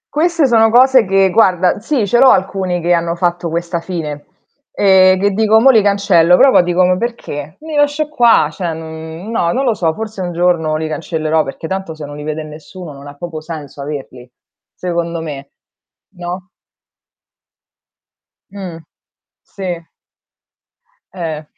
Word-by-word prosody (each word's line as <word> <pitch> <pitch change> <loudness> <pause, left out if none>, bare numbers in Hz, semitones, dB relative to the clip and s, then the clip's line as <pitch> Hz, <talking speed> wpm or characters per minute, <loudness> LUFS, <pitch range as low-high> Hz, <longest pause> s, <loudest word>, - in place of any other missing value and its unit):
Queste 335 -1 +2
sono 225 -3 +4
cose 255 +1 +5
che 195 0 +2
guarda 185 -3 +3
sì 230 +1 -1
ce 240 +5 +2
l'ho 265 - +7
alcuni 190 -3 +1
che 175 +1 +2
hanno 170 0 0
fatto 175 -1 -1
questa 170 +1 -3
fine, 155 -4 -6 0.5
ehm, 190 -1 +4
che 200 +1 +1
dico: 220 +2 +3
"Mò 270 +3 +6
li 225 -4 +4
cancello". 195 -4 +3
Però 270 - +6
poi - - +6
dico: 175 +1 +2
"Ma 180 0 +2
perché? 155 -10 -5
Li 315 0 -8
lascio 290 +1 +1
qua". 240 - +4
Cioè 170 0 -4
non 160 +4 -8
no, 170 -7 0
non 270 +2 -1
lo 240 - +2
so, 170 -6 0
forse 220 -2 -6
un 175 -1 -3
giorno 170 -3 +1
li 155 0 -2
cancellerò, 155 +1 -1
perché 135 +3 -8
tanto 190 -2 -4
se 155 -1 -8
non 145 0 -9
li 150 - -8
vede 155 +1 -4
nessuno, 155 +2 -10
non 140 +1 -12
ha 145 - -11
proprio 160 0 -7
senso 155 -4 -8
averli? 135 -3 -7 0.5
Secondo 170 -2 -3
me, 140 -3 -7 0.7
no? 180 +1 -6 2.0
Mh. 190 -4 -8 0.7
Sì. 180 -4 -6 1.3
Eh. 160 -3 -5
175 Hz, 160 wpm, -16 LUFS, 160-205 Hz, 2.0 s, l'ho